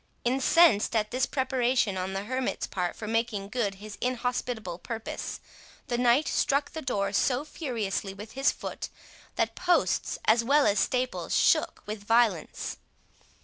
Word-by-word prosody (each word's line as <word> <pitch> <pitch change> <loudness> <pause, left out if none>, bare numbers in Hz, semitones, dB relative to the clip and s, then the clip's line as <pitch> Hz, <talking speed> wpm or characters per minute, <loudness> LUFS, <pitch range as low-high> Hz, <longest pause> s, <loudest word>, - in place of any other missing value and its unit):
Incensed 260 -2 +4
at 215 -1 +1
this 255 +2 +1
preparation 255 -5 +1
on 185 +1 -3
the 195 +1 -3
hermit's 255 +3 -2
part 180 -2 -3
for 215 - -7
making 225 -3 -1
good 210 -4 -1
his 205 +1 -10
inhospitable 245 -6 -2
purpose, 225 +1 -5 0.5
the 240 - 0
knight 245 +5 +4
struck 280 +1 +1
the 320 - -5
door 200 -7 -1
so 255 +6 +1
furiously 225 - -3
with 205 +3 -10
his 270 +1 +2
foot, - - -6 0.5
that - - 0
posts 360 -1 +1
as 230 +2 +4
well 280 +4 +4
as 205 0 +3
staples 255 +4 0
shook - - +2
with 210 -1 -6
violence. 225 -6 +1
235 Hz, 145 wpm, -28 LUFS, 205-255 Hz, 0.5 s, Incensed